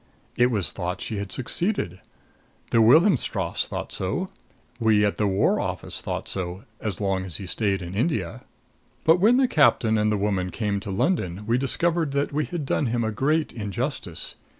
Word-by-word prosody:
"It 120 0 +4
was 105 -7 -1
thought 90 0 -4
she 110 - -4
had 100 -1 -4
succeeded 130 - -1 0.7
the 115 - +5
Wilhelmstrasse 155 - +3
thought - - -5
so 175 - -2 0.5
we 110 -3 +4
at 105 - 0
the 105 - +1
War 95 0 +2
Office - - -4
thought - - -4
so, 90 +1 -4 0.2
as 105 -5 -4
long 95 -2 0
as 90 -4 -5
he 100 - -7
stayed 95 +1 -1
in 85 +1 -7
India. 110 - -1 0.6
"But 160 +2 +6
when 225 +6 +5
the 265 -1 +4
captain 115 - +3
and 105 0 +2
the 105 - +1
woman 100 -2 0
came 105 +1 -2
on 100 - 0
to 100 - -8
London 95 - -1
we 115 +3 +2
discovered 160 +2 0
that 140 +1 0
we 150 +1 0
had 170 -5 -4
done 135 0 0
him 115 0 0
a 110 - -1
great 150 +8 0
injustice. 110 - -4
110 Hz, 185 wpm, -25 LUFS, 95-145 Hz, 0.7 s, But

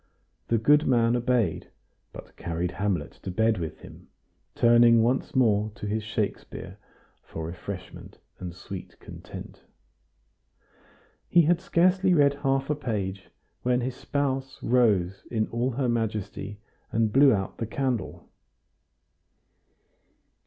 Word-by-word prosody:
The 115 - +2
good 145 +7 +4
man 120 -2 +3
obeyed, 120 -7 0 0.4
but - - -12
carried 85 +1 -3
"Hamlet" 90 -5 -2
to - - -6
bed 110 +2 +1
with 80 -2 -5
him, - - -13 0.5
turning 120 -1 +6
once 130 +5 0
more 110 -4 +3
to 110 - -7
his 105 +2 -1
Shakespeare 105 -1 -4 0.4
for 80 - -7
refreshment 90 +2 -8 0.2
and 90 -1 -5
sweet 90 +1 -9
content. - - -10 1.7
He 175 -1 +6
had 170 +2 +2
scarcely 185 +1 +3
read 140 -2 +5
half 135 -1 +1
a - - +1
page, 100 -9 -4 0.3
when 125 0 +1
his 125 +1 -3
spouse 135 -2 -2
rose 100 -7 +2
in 110 -2 0
all 120 +2 0
her 130 +1 -1
majesty 105 -3 -2 0.3
and 110 -1 +1
blew 140 0 +7
out 95 -4 -2
the 115 - -2
candle. 130 -3 -3
115 Hz, 125 wpm, -26 LUFS, 100-130 Hz, 1.7 s, blew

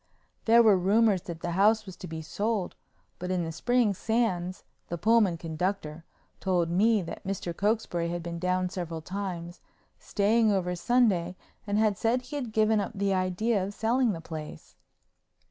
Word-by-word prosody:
There 235 +1 +6
were 205 -4 +5
rumors 200 +1 +3
that 165 -1 -6
the 175 - -3
house 210 +4 +3
was 190 -2 -9
to 180 - -8
be 160 -1 -6
sold, 205 +3 -2 0.5
but 180 +1 -4
in 180 -2 0
the 165 - -4
spring 230 +5 +1
Sands, 190 -4 -1 0.2
the 170 - -4
Pullman 215 -2 +3
conductor, 165 -1 -3 0.3
told 175 -3 0
me 210 +3 +3
that 165 - -8
Mr. 185 -3 -4
Cokesbury 200 -5 0
had 175 0 -4
been 170 0 -5
down 180 +1 0
several 170 -3 -5
times, 180 -2 -5 0.4
staying 220 +2 +2
over 180 -2 0
Sunday 185 -3 +2 0.3
and 205 0 0
had 215 -2 +2
said 245 +3 +1
he 255 +4 -8
had 250 -6 -4
given 215 0 +3
up 200 - -5
the 200 0 0
idea 185 +3 0
of 200 +2 -5
selling 235 +1 +1
the 165 - -6
place. 155 - -9
190 Hz, 170 wpm, -28 LUFS, 175-220 Hz, 0.5 s, There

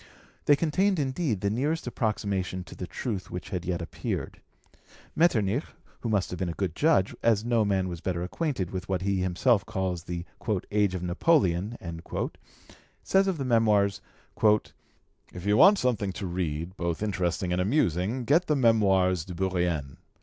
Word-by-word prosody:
They 145 - +6
contained 185 +6 +1
indeed 130 - -1
the 100 - +1
nearest 145 +8 -1
approximation 100 -6 -2
to - - -12
the 90 - -6
truth 100 +2 -4
which 90 - -6
had 90 -3 -3
yet 90 -1 -2
appeared. - - -5 0.7
Metternich, 125 - +2 0.4
who 115 - -3
must 100 -4 0
have 90 - -5
been 90 - -1
a - - -3
good 90 -5 -2
judge, 150 - +2
as 115 -2 +2
no 120 -2 +2
man 95 -2 +1
was 85 -2 -6
better 90 -2 -2
acquainted 100 - -2
with 95 +1 -5
what 95 -1 -1
he 100 0 +1
himself 95 +5 +2
calls 90 -3 -3
the 85 0 -4 0.5
"age 100 -3 +2
of 90 - -4
Napoleon," 95 - +2 1.3
says 195 0 +3
of 190 -3 0
the 135 - -3
Memoirs: 105 -5 +3 0.4
"If 105 -3 -2
you 105 +1 +3
want 195 - +7
something 110 - 0
to 100 - -5
read, 85 -1 -3
both 85 +2 -2
interesting 90 -3 -1
and 90 - +1
amusing, 105 - +1
get 160 +8 +3
the 150 - +2
Memoires 95 - +3
de 90 +1 -8
Bourrienne. 85 -6 -1
100 Hz, 165 wpm, -27 LUFS, 90-120 Hz, 1.3 s, want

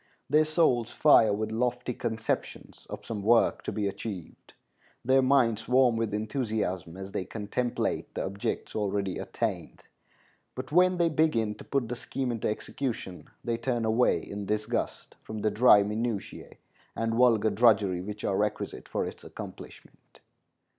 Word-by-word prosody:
Their 155 +1 +5
souls 155 -7 +2
fire 115 -8 +5
with 110 +1 -2
lofty 125 +2 -1
conceptions 110 -2 -4
of - - -7
some 110 -3 -4
work 115 +3 +3
to - - -2
be 105 -2 -1
achieved, 100 -3 -7 0.5
their 135 +1 +5
minds 130 -5 +2
warm 125 -1 +4
with 115 -1 -1
enthusiasm 105 - -2
as 95 0 -7
they 95 - -2
contemplate 115 +4 -2
the - - -2
objects 100 +1 -4
already 100 -2 -1
attained; - - -4 0.7
but 130 +2 -6
when 180 +2 +4
they 170 -1 +3
begin 150 -9 +1
to 105 - -12
put 135 -4 -1
the 125 - -4
scheme 130 +1 -3
into 115 -2 -2
execution 110 -4 -4
they 115 -1 -1
turn 120 -1 -1
away 110 +3 +3
in 100 0 -7
disgust 105 +3 -3
from 110 - -7
the 110 - +1
dry 105 -1 +6
minutiæ 110 0 -4 0.4
and 115 0 -1
vulgar 115 -3 +4
drudgery 100 -4 +3
which 105 +2 -7
are 95 - 0
requisite 105 0 -2
for - - -1
its - - -8
accomplishment. - - -11
115 Hz, 150 wpm, -28 LUFS, 105-125 Hz, 0.7 s, dry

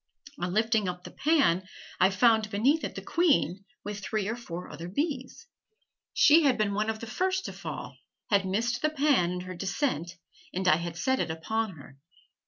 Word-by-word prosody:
On 175 - -2
lifting 220 -1 +2
up 180 0 -6
the - - -9
pan, 275 - +2 0.3
I 185 - +6
found 220 +2 +3
beneath 255 +10 +2
it - - -4
the - - -6
queen 270 - +1 0.2
with 205 0 -5
three 205 0 -2
or 225 - -1
four 180 -7 -7
other 165 +3 -8
bees. 275 - -3 0.7
She 310 +3 +6
had 275 -5 +3
been 210 -2 +1
one 215 +2 0
of 220 0 -3
the - - -5
first 375 +10 -1
to - - -5
fall, - - -7 0.3
had 200 -1 +4
missed 225 +6 -1
the 305 - +2
pan 280 - +2
in 180 0 -3
her 185 0 -7
descent, 190 - -2 0.4
and 185 0 -1
I 155 - +6
had 170 0 -5
set 260 +9 +1
it - - -1
upon 210 +6 -2
her. 140 -3 -14
215 Hz, 190 wpm, -28 LUFS, 180-260 Hz, 0.7 s, I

